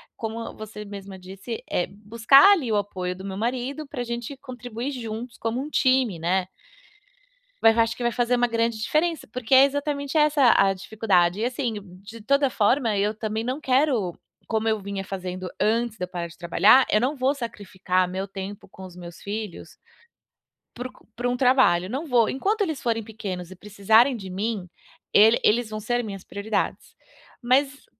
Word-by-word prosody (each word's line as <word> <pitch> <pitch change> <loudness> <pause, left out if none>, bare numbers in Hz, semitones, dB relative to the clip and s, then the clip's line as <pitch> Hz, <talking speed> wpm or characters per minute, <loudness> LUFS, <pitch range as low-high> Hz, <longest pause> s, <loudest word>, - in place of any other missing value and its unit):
como 225 0 -5
você 210 -1 -8
mesma 200 -1 -9
disse, 195 +5 -7
é 175 - 0
buscar 230 - +5
ali 275 - -1
o - - +2
apoio 185 -3 -3
do 190 +1 -10
meu 190 -1 -5
marido 255 +6 -3
pra 255 -4 -4
gente 240 +3 -5
contribuir 250 -1 -6
juntos 230 -2 -6
como 230 +2 -2
um 295 - -6
time, 260 - +2
né. 180 +2 0 1.1
Vai 225 - +7
acho 230 0 +1
que 245 - -5
vai 240 - +1
fazer 245 0 +1
uma 245 0 +2
grande 230 0 0
diferença, 315 +7 0
porque 250 +2 -3
é 265 +1 +8
exatamente 285 0 -3
essa 300 -5 +5
a 195 0 +4
dificuldade. 190 -2 +1
E, 230 - 0
assim, 250 -2 -2 0.3
de 220 +2 -11
toda 280 +3 +2
forma, 225 0 +2
eu 205 +2 0
também 220 0 -3
não 255 +5 -3
quero 255 - +1 0.3
como 220 0 -1
eu 220 -1 0
vinha 200 0 -5
fazendo 185 -1 -5
antes 230 0 +1
de 180 - -5
eu - - -20
parar 175 -1 -5
de 170 - -16
trabalhar, 190 +9 +5
eu 210 - +3
não 275 +4 0
vou 265 +2 +2
sacrificar 185 -6 -2
meu 190 +2 -4
tempo 195 +1 -7
com 190 0 -11
os 180 -1 -12
meus 170 -1 -10
filhos 205 -2 -6 1.0
para 250 +1 -5
um - - -17 0.2
para 245 +1 -1
um 245 - -1
trabalho, 250 -9 +3
não 270 +8 -3
vou. 245 -6 +3
Enquanto 410 +11 -1
eles 315 -9 -1
forem 225 -2 -1
pequenos 195 -5 -6
e - - -9
precisarem 210 +6 +3
de 195 -4 -8
mim, 195 0 -3 0.4
ele 220 +3 +6
eles 230 +1 +3
vão 215 0 -5
ser 240 +3 -1
minhas 195 -4 -7
prioridades. 200 +2 -3 0.5
Mas 270 +3 +1
225 Hz, 180 wpm, -24 LUFS, 195-255 Hz, 1.1 s, é